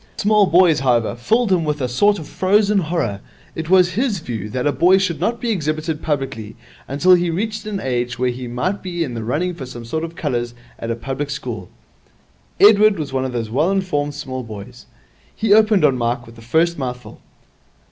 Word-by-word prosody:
Small 210 Hz, -1 st, +3 dB
boys, 175 Hz, -4 st, +4 dB
however, 120 Hz, -4 st, +1 dB
filled 220 Hz, -, +1 dB
him 180 Hz, -3 st, +3 dB
with 150 Hz, -1 st, -2 dB
a 130 Hz, -, -1 dB
sort 205 Hz, +12 st, +2 dB
of 160 Hz, -, -8 dB
frozen 205 Hz, +2 st, +2 dB
horror. 155 Hz, -, -2 dB, 0.3 s
It 160 Hz, 0 st, -5 dB
was 180 Hz, -1 st, +5 dB
his 225 Hz, +2 st, 0 dB
view 115 Hz, -, -5 dB
that 125 Hz, +3 st, -3 dB
a 145 Hz, -, +3 dB
boy 175 Hz, +8 st, +4 dB
should 185 Hz, -4 st, -1 dB
not 235 Hz, 0 st, -1 dB
be 235 Hz, -, -1 dB
exhibited 155 Hz, -3 st, -2 dB
publicly 135 Hz, -8 st, -3 dB, 0.3 s
until 145 Hz, +7 st, +4 dB
he 175 Hz, -1 st, +3 dB
reached 215 Hz, +5 st, -3 dB
an 205 Hz, -2 st, -3 dB
age 125 Hz, -3 st, -2 dB
when 125 Hz, 0 st, 0 dB
he 125 Hz, 0 st, -7 dB
might 125 Hz, +12 st, -2 dB
be 175 Hz, -2 st, -3 dB
in 130 Hz, -6 st, -5 dB
the 115 Hz, -1 st, -4 dB
running 160 Hz, +10 st, -1 dB
for 135 Hz, -6 st, -8 dB
some 120 Hz, -2 st, -9 dB
sort 160 Hz, +7 st, -3 dB
of 165 Hz, 0 st, -6 dB
colours 120 Hz, -6 st, -3 dB, 0.2 s
at 115 Hz, -, -5 dB
a 115 Hz, -, -1 dB
public 135 Hz, +4 st, -4 dB
school. 120 Hz, -9 st, -5 dB, 0.9 s
Edward 210 Hz, 0 st, +6 dB
was 145 Hz, -4 st, -5 dB
one 130 Hz, 0 st, 0 dB
of 130 Hz, -, -3 dB
those 115 Hz, -3 st, -4 dB
well 150 Hz, +9 st, +2 dB
informed 150 Hz, -7 st, -1 dB
small 130 Hz, -3 st, -5 dB
boys. 115 Hz, +1 st, -10 dB, 0.5 s
He 220 Hz, -2 st, +2 dB
opened 215 Hz, -5 st, +5 dB
on 135 Hz, -4 st, +2 dB
Mike 120 Hz, +1 st, -1 dB
with 115 Hz, 0 st, -14 dB
the 115 Hz, -, -14 dB
first 160 Hz, +8 st, +1 dB
mouthful. 125 Hz, -2 st, -6 dB
150 Hz, 205 wpm, -20 LUFS, 125-185 Hz, 0.9 s, Edward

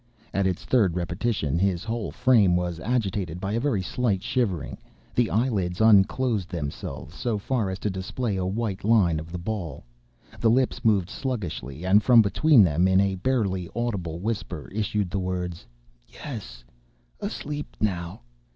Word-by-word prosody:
At 100 Hz, -1 st, +2 dB
its 90 Hz, -2 st, -3 dB
third 100 Hz, -10 st, +3 dB
repetition, 85 Hz, -, -1 dB
his 90 Hz, -2 st, +1 dB
whole 115 Hz, -1 st, -3 dB
frame 105 Hz, -9 st, +4 dB
was 90 Hz, -1 st, -1 dB
agitated 95 Hz, -6 st, -1 dB
by 100 Hz, +2 st, -3 dB
a 115 Hz, -, 0 dB
very 120 Hz, -8 st, 0 dB
slight 105 Hz, -2 st, -1 dB
shivering; 105 Hz, -, -1 dB, 0.3 s
the 120 Hz, -2 st, +2 dB
eyelids 100 Hz, -7 st, 0 dB
unclosed 110 Hz, -1 st, +4 dB
themselves 75 Hz, -3 st, -5 dB
so 115 Hz, +4 st, -2 dB
far 110 Hz, -1 st, -1 dB
as 95 Hz, -, -3 dB
to 105 Hz, -, -2 dB
display 100 Hz, +4 st, -3 dB
a 95 Hz, -, -1 dB
white 100 Hz, 0 st, -2 dB
line 100 Hz, -7 st, +3 dB
of 80 Hz, +1 st, -9 dB
the 90 Hz, -, -4 dB
ball; 90 Hz, -4 st, -5 dB, 0.5 s
the 115 Hz, -, +3 dB
lips 125 Hz, +1 st, +1 dB
moved 100 Hz, -5 st, +2 dB
sluggishly, 90 Hz, -, -4 dB
and 100 Hz, +3 st, +5 dB
from 120 Hz, -1 st, +6 dB
between 125 Hz, +4 st, +5 dB
them, 85 Hz, +1 st, +3 dB
in 95 Hz, 0 st, +4 dB
a 100 Hz, -1 st, +2 dB
barely 95 Hz, -4 st, -1 dB
audible 100 Hz, -9 st, -2 dB
whisper, 95 Hz, -5 st, -4 dB
issued 105 Hz, -2 st, -1 dB
the 100 Hz, -, -1 dB
words: 90 Hz, -2 st, -4 dB, 0.4 s
"Yes;—asleep -, -, -8 dB
now. 85 Hz, -8 st, -2 dB
95 Hz, 150 wpm, -25 LUFS, 90-115 Hz, 0.5 s, from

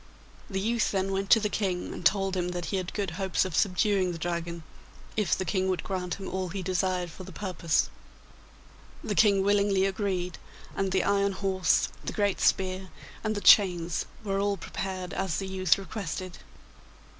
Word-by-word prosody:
The 190 Hz, -2 st, -2 dB
youth 230 Hz, +3 st, +1 dB
then 195 Hz, 0 st, -1 dB
went 195 Hz, 0 st, -2 dB
to 225 Hz, -, +8 dB
the 210 Hz, -, 0 dB
King 190 Hz, -4 st, -2 dB
and -, -, -7 dB
told 195 Hz, +2 st, +2 dB
him 180 Hz, -1 st, 0 dB
that 175 Hz, -, -3 dB
he -, -, +2 dB
had 185 Hz, -1 st, -3 dB
good 200 Hz, -4 st, -1 dB
hopes 190 Hz, -1 st, +1 dB
of 185 Hz, -4 st, -4 dB
subduing 190 Hz, 0 st, +2 dB
the 170 Hz, -, -5 dB
Dragon, 170 Hz, 0 st, -3 dB, 0.5 s
if 210 Hz, -3 st, +1 dB
the 190 Hz, -, -2 dB
King 190 Hz, 0 st, 0 dB
would 185 Hz, -1 st, -1 dB
grant 180 Hz, -2 st, -3 dB
him 195 Hz, -, -7 dB
all 185 Hz, -1 st, -3 dB
he 190 Hz, +2 st, -4 dB
desired 185 Hz, -1 st, 0 dB
for 185 Hz, -, -10 dB
the 190 Hz, -, -10 dB
purpose. 170 Hz, -2 st, 0 dB, 1.2 s
The 210 Hz, -, -2 dB
King 200 Hz, -2 st, +4 dB
willingly 200 Hz, -1 st, +3 dB
agreed, 190 Hz, -2 st, -2 dB, 0.4 s
and 195 Hz, -1 st, 0 dB
the 190 Hz, -1 st, +2 dB
iron 200 Hz, 0 st, +2 dB
horse, 190 Hz, -3 st, +1 dB
the -, -, -4 dB
great 205 Hz, -2 st, +1 dB
spear, 185 Hz, 0 st, +1 dB, 0.3 s
and 215 Hz, -1 st, 0 dB
the 205 Hz, -, -3 dB
chains 175 Hz, -6 st, +5 dB, 0.2 s
were 195 Hz, -2 st, -1 dB
all 200 Hz, 0 st, +1 dB
prepared 185 Hz, 0 st, -5 dB
as 190 Hz, -4 st, -1 dB
the 195 Hz, -, -3 dB
youth 185 Hz, -2 st, +2 dB
requested. 185 Hz, -3 st, -5 dB
190 Hz, 180 wpm, -28 LUFS, 180-200 Hz, 1.2 s, to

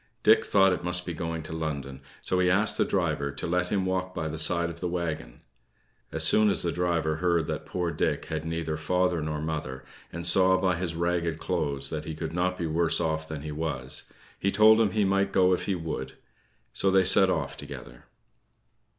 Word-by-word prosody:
Dick -, -, +6 dB
thought 95 Hz, -2 st, +4 dB
it 90 Hz, -, -4 dB
must 90 Hz, 0 st, +1 dB
be 85 Hz, -, -4 dB
going 80 Hz, 0 st, -4 dB
to 80 Hz, -, -7 dB
London, 70 Hz, -4 st, -4 dB, 0.2 s
so 90 Hz, -, 0 dB
he 90 Hz, 0 st, +3 dB
asked 100 Hz, +4 st, +2 dB
the -, -, +2 dB
driver 70 Hz, 0 st, -1 dB
to 70 Hz, -, -4 dB
let 90 Hz, +1 st, 0 dB
him 95 Hz, -2 st, +1 dB
walk 95 Hz, 0 st, -2 dB
by 80 Hz, -, -2 dB
the 80 Hz, +1 st, -5 dB
side 85 Hz, +1 st, +1 dB
of 85 Hz, -, -12 dB
the 90 Hz, -, -2 dB
wagon. 80 Hz, -8 st, -4 dB, 0.7 s
As -, -, -1 dB
soon 110 Hz, -1 st, +4 dB
as 100 Hz, -, +2 dB
the 85 Hz, -, 0 dB
driver 85 Hz, -3 st, 0 dB
heard 85 Hz, -2 st, +1 dB
that -, -, -5 dB
poor 90 Hz, -2 st, -2 dB
Dick -, -, -1 dB
had 80 Hz, -1 st, -4 dB
neither 80 Hz, -1 st, -3 dB
father 90 Hz, +2 st, 0 dB
nor 75 Hz, 0 st, -3 dB
mother, 75 Hz, -4 st, -4 dB, 0.3 s
and 85 Hz, +1 st, -5 dB
saw 95 Hz, +1 st, +4 dB
by 95 Hz, -2 st, +1 dB
his 85 Hz, -2 st, -3 dB
ragged 85 Hz, -1 st, -1 dB
clothes 70 Hz, -6 st, -2 dB
that 75 Hz, -1 st, -4 dB
he 80 Hz, -, -5 dB
could 80 Hz, 0 st, -5 dB
not 90 Hz, +1 st, 0 dB
be 85 Hz, -, -3 dB
worse 80 Hz, +1 st, +2 dB
off 80 Hz, 0 st, -1 dB
than 80 Hz, -3 st, -6 dB
he 75 Hz, -, -5 dB
was, 75 Hz, -4 st, -2 dB, 0.3 s
he 100 Hz, -, +1 dB
told 110 Hz, +2 st, +6 dB
him 110 Hz, -, +3 dB
he 105 Hz, 0 st, +1 dB
might 100 Hz, 0 st, +1 dB
go 95 Hz, -1 st, +4 dB
if 90 Hz, -, -2 dB
he 100 Hz, -, +1 dB
would; 80 Hz, -6 st, -5 dB, 0.6 s
so 95 Hz, -, +3 dB
they 95 Hz, 0 st, +4 dB
set -, -, +5 dB
off -, -, -2 dB
together. -, -, -10 dB
85 Hz, 210 wpm, -27 LUFS, 80-90 Hz, 0.7 s, Dick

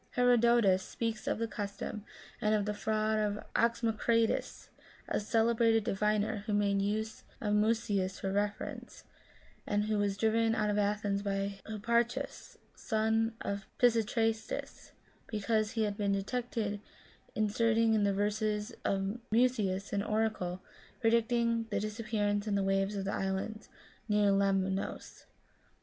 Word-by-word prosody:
Herodotus 235 Hz, -5 st, +4 dB
speaks 225 Hz, +2 st, -4 dB
of -, -, +1 dB
the 230 Hz, +1 st, -1 dB
custom, 205 Hz, 0 st, -5 dB, 0.4 s
and 215 Hz, -1 st, +3 dB
of 205 Hz, -1 st, 0 dB
the 210 Hz, -, -1 dB
fraud 215 Hz, +1 st, 0 dB
of 210 Hz, -1 st, 0 dB, 0.2 s
Oxoma 230 Hz, -1 st, +1 dB
critus, 230 Hz, 0 st, 0 dB, 0.4 s
a -, -, 0 dB
celebrated 225 Hz, 0 st, +2 dB
diviner, 210 Hz, 0 st, 0 dB
who 210 Hz, -, 0 dB
made 200 Hz, -1 st, +2 dB
use 215 Hz, +2 st, -2 dB, 0.2 s
of 210 Hz, -2 st, -1 dB
Musoeus 210 Hz, -3 st, +1 dB
for 195 Hz, -, -2 dB
reference, 205 Hz, +1 st, -3 dB, 0.6 s
and 205 Hz, 0 st, +1 dB
who 215 Hz, 0 st, 0 dB
was 200 Hz, -1 st, 0 dB
driven 225 Hz, +1 st, +2 dB
out 210 Hz, -1 st, +1 dB
of 205 Hz, -, +1 dB
Athens 205 Hz, -1 st, 0 dB
by 200 Hz, 0 st, -2 dB
Hipparchus, 235 Hz, +2 st, -1 dB, 0.2 s
son 220 Hz, 0 st, 0 dB
of 200 Hz, -1 st, -4 dB
Pisistratus, 225 Hz, -, 0 dB, 0.4 s
because 215 Hz, 0 st, 0 dB
he 225 Hz, -2 st, +1 dB
had 205 Hz, -1 st, -2 dB
been 200 Hz, -1 st, +1 dB
detected 210 Hz, 0 st, -2 dB, 0.5 s
inserting 225 Hz, +1 st, +2 dB
in 215 Hz, -2 st, +3 dB
the 200 Hz, -, +3 dB
verses 210 Hz, +2 st, -1 dB
of 195 Hz, +3 st, -1 dB
Musoeus 215 Hz, -5 st, +1 dB
an 200 Hz, -, +1 dB
oracle 210 Hz, -4 st, -1 dB, 0.4 s
predicting 230 Hz, -1 st, +2 dB
the 205 Hz, -2 st, 0 dB
disappearance 210 Hz, -1 st, -1 dB
in 205 Hz, -, +1 dB
the 200 Hz, -, +1 dB
waves 195 Hz, +1 st, +1 dB
of 195 Hz, -1 st, -3 dB
the 200 Hz, -, -2 dB
islands 195 Hz, +3 st, -3 dB, 0.4 s
near 210 Hz, -1 st, +4 dB
Lemnos. 195 Hz, -1 st, -1 dB
215 Hz, 135 wpm, -32 LUFS, 200-225 Hz, 0.6 s, Herodotus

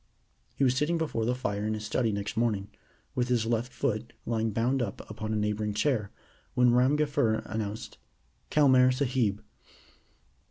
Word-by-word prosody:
He -, -, 0 dB
was 130 Hz, -1 st, +3 dB
sitting 150 Hz, +5 st, +1 dB
before 150 Hz, -9 st, -1 dB
the 125 Hz, +2 st, +1 dB
fire 105 Hz, -5 st, -2 dB
in 110 Hz, 0 st, 0 dB
his 105 Hz, 0 st, -5 dB
study 115 Hz, +1 st, +1 dB
next 100 Hz, 0 st, -3 dB
morning, 105 Hz, -4 st, 0 dB, 0.4 s
with 125 Hz, -1 st, 0 dB
his 120 Hz, -3 st, +1 dB
left 120 Hz, +2 st, -1 dB
foot 115 Hz, -2 st, -2 dB
lying 115 Hz, -1 st, 0 dB
bound 120 Hz, +5 st, +1 dB
up 105 Hz, -4 st, -4 dB
upon 110 Hz, 0 st, -4 dB
a -, -, 0 dB
neighboring 105 Hz, 0 st, -1 dB
chair, 110 Hz, -4 st, +1 dB, 0.5 s
when 125 Hz, -1 st, +5 dB
Ram 130 Hz, +4 st, +4 dB
Gafur 145 Hz, -7 st, +1 dB
announced 110 Hz, -1 st, -5 dB, 0.5 s
"Kelmare 130 Hz, -4 st, +5 dB
Sahib." 125 Hz, -6 st, 0 dB
115 Hz, 160 wpm, -29 LUFS, 110-130 Hz, 0.5 s, when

